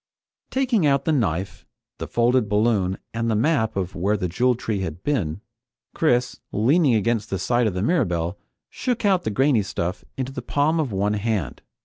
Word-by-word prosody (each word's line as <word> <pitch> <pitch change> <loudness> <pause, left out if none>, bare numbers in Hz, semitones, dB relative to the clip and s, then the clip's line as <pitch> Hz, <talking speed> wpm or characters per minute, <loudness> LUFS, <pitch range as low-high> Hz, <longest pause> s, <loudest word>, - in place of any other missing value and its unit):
Taking 245 - +1
out 140 -1 +2
the - - +2
knife, 95 - -1 0.3
the - - -4
folded 120 -2 +2
balloon, 105 -3 +1 0.2
and 115 0 -1
the 110 - +1
map 110 -1 +1
of 95 -1 -2
where 100 +3 0
the 90 - -2
Jewel 125 +8 +2
Tree 110 -3 -3
had 90 -2 -5
been, 100 - -1 0.5
Chris, 125 -5 +1
leaning 130 - +3
against 110 0 0
the 95 - -1
side 120 +6 +1
of 100 - -2
the 90 - -1
Mirabelle, 90 - 0 0.3
shook 245 -4 -2
out 190 -3 +2
the - - +1
grainy 130 +1 +3
stuff 90 -1 -3
into 130 0 -3
the - - -5
palm 155 +3 +1
of 145 -7 -1
one 100 +2 0
hand. 105 - -2
115 Hz, 180 wpm, -23 LUFS, 95-135 Hz, 0.5 s, leaning